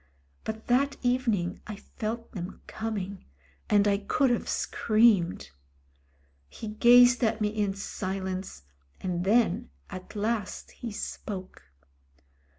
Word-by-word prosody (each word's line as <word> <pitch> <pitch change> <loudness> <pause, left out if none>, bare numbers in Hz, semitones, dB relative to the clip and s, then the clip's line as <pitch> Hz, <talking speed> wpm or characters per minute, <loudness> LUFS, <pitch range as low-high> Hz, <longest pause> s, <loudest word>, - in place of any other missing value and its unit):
But 220 0 -5
that 275 +3 +2
evening 230 -8 +1
I 215 - -5
felt 225 +3 -5
them 180 -1 -7
coming, 200 -3 -4 0.4
and 205 0 +4
I 200 -1 +3
could 255 +6 +2
have 240 - -1
screamed. 210 - +2 1.0
He 215 - -7
gazed 245 +3 +6
at 220 0 +2
me 210 -1 +1
in 205 -2 -1
silence 190 - -4 0.4
and 180 -1 -2
then 215 -2 +2 0.2
at 185 +3 -8
last 210 -1 -2
he 235 - -7
spoke. 185 - -6
210 Hz, 115 wpm, -28 LUFS, 190-230 Hz, 1.0 s, gazed